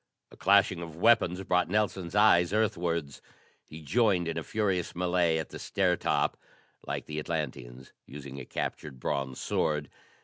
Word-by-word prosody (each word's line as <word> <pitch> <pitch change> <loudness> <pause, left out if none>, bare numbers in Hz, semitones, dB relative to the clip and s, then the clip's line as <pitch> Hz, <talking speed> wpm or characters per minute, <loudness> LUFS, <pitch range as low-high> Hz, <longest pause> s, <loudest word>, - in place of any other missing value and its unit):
A - - -14
clashing 100 -3 +3
of 85 -2 -8
weapons 95 -2 +3
brought 90 -2 +1
Nelson's 100 -3 -1
eyes 95 -4 +5
earthwards. 85 -9 -1 0.4
He 80 +1 -11
joined 95 - +2
in 80 - -2
a 80 - -2
furious 95 -4 -1
melée 90 -2 +1
at 80 - -5
the - - -9
stair - - +1
top, - - 0 0.5
like - - -3
the 75 0 -4
Atlanteans, 65 -6 -5
using 70 -1 -8
a 65 - -8
captured 70 0 -5
bronze 65 0 -3
sword. 75 -2 -1
85 Hz, 150 wpm, -29 LUFS, 75-95 Hz, 0.5 s, eyes